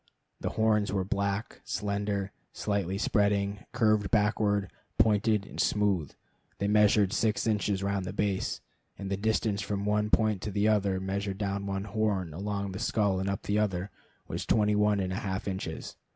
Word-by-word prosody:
The - - -2
horns 110 -2 +3
were 95 -1 0
black, 100 +2 -2
slender, 100 -1 -2 0.2
slightly 100 -2 -1
spreading, 100 -1 +1
curved 110 -3 +2
backward, 105 -3 +2 0.3
pointed, 105 -1 +3
and - - -10
smooth. 100 -8 +1 0.5
They 100 - -1
measured 105 -1 +4
six 110 -3 +1
inches 105 -3 0
round 100 -1 -1
the - - -4
base, 100 -2 -1 0.4
and 100 0 -5
the - - +2
distance 105 0 0
from 100 0 -2
one 105 0 +1
point 105 -3 +2
to - - -3
the 100 +2 +2
other, 100 -3 +2
measured 95 +1 -3
down 100 -1 -2
one 95 0 -2
horn, 100 -5 -1
along 100 +2 -3
the 95 - -6
skull, 105 -4 +1
and 95 +1 -1
up 100 - -3
the 105 +1 +1
other, 95 -2 -1 0.4
was - - -3
twenty 105 -1 +2
one 105 0 +3
and 95 -1 -1
a - - -2
half 95 0 -3
inches. 95 -4 -4
100 Hz, 170 wpm, -29 LUFS, 95-105 Hz, 0.5 s, measured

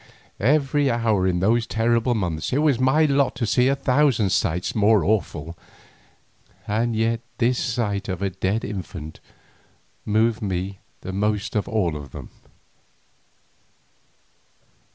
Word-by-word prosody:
Every 140 +3 +2
hour 115 -6 +1
in 90 -1 0
those 115 +4 +2
terrible 115 +2 +1
months 85 -7 -2
it 130 - +1
was 140 -6 +2
my 135 +5 +3
lot 140 -2 +2
to 120 0 -1
see 125 +3 +2
a 135 - +3
thousand 130 -7 +2
sights 90 -1 0
more 105 -1 +3
awful, 85 -6 -1 1.1
and 115 +2 0
yet 115 +1 +1 0.2
this 125 +1 +1
sight 105 -5 -2
of 95 +1 -3
a 100 - 0
dead 95 +4 -1
infant 90 -6 -7 0.8
moved 110 +2 +1
me 95 -1 -3 0.2
the 95 - -6
most 105 +1 -1
of 105 - 0
all 95 -8 0
of 70 -3 -9
them. - - -9
110 Hz, 130 wpm, -23 LUFS, 95-120 Hz, 1.1 s, my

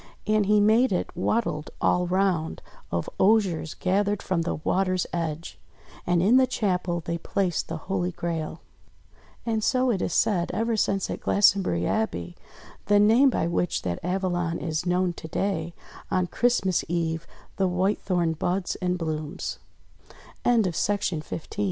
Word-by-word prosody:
And 215 -2 +2
he 210 0 +5
made 220 +4 +4
it 180 - -2
"wattled 180 -4 -1
all 180 0 +2
round" 180 -3 0 0.3
of 85 0 -1
osiers 190 -6 +2
gathered 200 +2 0
from 185 -3 0
the 165 - -2
water's 185 +3 0
edge. 165 -1 -4 0.5
And 175 -1 +3
in 225 +7 +5
the 260 0 +5
chapel 180 -7 -1
they 170 0 -2
placed 180 -1 -1
the 165 - -4
Holy 180 -2 -1
Grail. 165 -2 -4 0.8
And 220 -2 0
so, 255 +1 +2
it 195 -5 -1
is - - -1
said, 180 -5 +2
ever 225 +2 0
since 195 -2 0
at - - -4
Glastonbury 195 - +3
Abbey 85 - -2 0.5
the 205 0 +5
name 230 +7 +6
by 240 - 0
which 170 +1 -1
that 85 -2 -2
Avalon 175 -2 -1
is 160 +1 -3
known 180 0 +1
to 160 - -9
day 170 -1 -2 0.2
— - - -15
on 185 -1 +1
Christmas 190 -3 +1
Eve 165 -1 -1 0.3
the 190 - +2
White 185 +3 0
Thorn 175 -4 0
185 Hz, 140 wpm, -26 LUFS, 170-205 Hz, 0.8 s, name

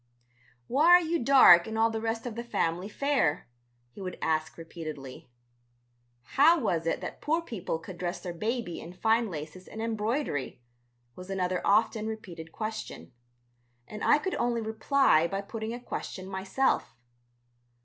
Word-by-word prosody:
"Why 280 - +2
are 355 +1 +8
you 335 -3 -1
dark 230 -10 +8
and 220 0 -4
all 225 0 +3
the 220 0 -3
rest 225 +1 -2
of 245 - -4
the 235 +2 -5
family 180 -5 -1
fair?" 270 - 0 0.4
he 160 - -12
would 185 -2 -5
ask 160 0 -1
repeatedly. 155 -6 -8 0.9
"How 305 - +4
was 170 - -1
it - - -1
that - - -7
poor 320 +3 +1
people 205 - -4
could 175 +2 -11
dress 175 0 -3
their 175 0 -6
baby 220 0 -3
in 170 - -10
fine 225 +4 +1
laces 160 +2 -8
and 220 - -9
embroidery?" 220 - -2 0.6
was 180 +1 -10
another 185 -1 -1
often 215 +1 +2
repeated 175 -7 -7
question. 215 - -6 0.7
And 210 -1 -7
I - - +5
could 375 +5 -3
only 240 -1 +1
reply 220 - +3
by 195 +2 -3
putting 220 +2 -5
a 240 - -5
question 190 -5 -6
myself. 190 - -1
215 Hz, 155 wpm, -28 LUFS, 175-235 Hz, 0.9 s, are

